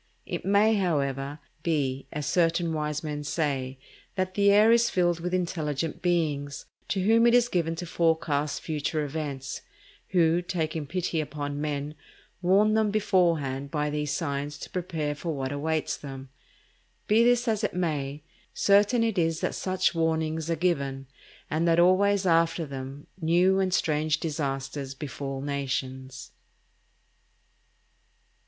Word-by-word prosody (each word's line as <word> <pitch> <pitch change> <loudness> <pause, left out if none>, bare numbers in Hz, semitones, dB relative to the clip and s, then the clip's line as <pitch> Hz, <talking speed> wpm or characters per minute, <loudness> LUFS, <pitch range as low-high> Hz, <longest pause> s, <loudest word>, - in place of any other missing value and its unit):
It - - -4
may, 205 +3 +4
however, 145 -7 -1 0.2
be, 135 -5 -1
as 150 -1 -4
certain 165 +1 +1
wise 150 -1 -2
men 150 -1 -4
say, 135 -4 -2 0.4
that 185 0 -1
the 200 0 +4
air 210 +3 +6
is 235 0 +4
filled 175 -2 +1
with 175 +1 -3
intelligent 165 -4 -2
beings, 150 -6 -1 0.2
to 190 -2 -1
whom 225 +3 +5
it 235 - +5
is 245 -1 +5
given 165 -6 0
to 175 +2 -5
forecast 160 -4 0
future 155 0 -2
events; 140 -2 -5 0.5
who, 170 -2 +3
taking 160 -4 -3
pity 175 0 -1
upon 145 -1 -4
men, 145 -1 -3 0.5
warn 200 +4 +4
them 220 -1 +3
beforehand 170 -10 +1
by 150 0 -1
these 150 0 -2
signs 145 -1 -2
to - - -8
prepare 165 -5 -2
for 160 +2 -4
what 135 -1 -3
awaits 155 +2 -1
them. 135 -2 -9 0.8
Be 220 +2 +4
this 245 0 +3
as 220 -1 0
it - - -1
may, 150 -5 -2 0.3
certain 205 +4 +4
it 225 -5 0
is 165 -1 +1
that - - -1
such 185 0 0
warnings 160 -1 0
are 165 - +2
given, 140 -6 -1 0.4
and 160 +2 0
that 165 0 +4
always 190 +2 +4
after 165 -1 +2
them 135 0 -7 0.2
new 180 +4 +3
and 190 -1 +1
strange 155 -3 +1
disasters 135 -3 -3
befall 135 -1 -5
nations. 130 -2 -4
160 Hz, 140 wpm, -27 LUFS, 145-180 Hz, 0.8 s, air